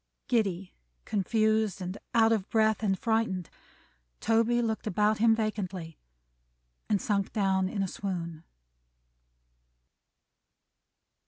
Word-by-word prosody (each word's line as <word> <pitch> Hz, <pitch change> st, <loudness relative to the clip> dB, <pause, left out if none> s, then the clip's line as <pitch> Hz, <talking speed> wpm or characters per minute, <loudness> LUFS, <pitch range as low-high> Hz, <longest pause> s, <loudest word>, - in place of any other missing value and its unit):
Giddy, 195 Hz, -6 st, 0 dB, 0.3 s
confused, 215 Hz, 0 st, +1 dB
and 185 Hz, 0 st, -4 dB, 0.2 s
out 225 Hz, -1 st, +5 dB
of 215 Hz, -4 st, 0 dB
breath, 220 Hz, -1 st, +2 dB
and 195 Hz, -3 st, +1 dB
frightened, 220 Hz, -5 st, -1 dB, 0.7 s
Toby 230 Hz, +2 st, +2 dB
looked 225 Hz, -2 st, -1 dB
about 210 Hz, +2 st, +2 dB
him 225 Hz, 0 st, +5 dB
vacantly, 190 Hz, -7 st, -4 dB, 0.9 s
and 205 Hz, -, +2 dB
sunk 200 Hz, -1 st, -1 dB
down 190 Hz, -2 st, +1 dB
in 200 Hz, -1 st, -1 dB
a -, -, -1 dB
swoon. 170 Hz, -4 st, -5 dB
210 Hz, 100 wpm, -29 LUFS, 190-220 Hz, 0.9 s, out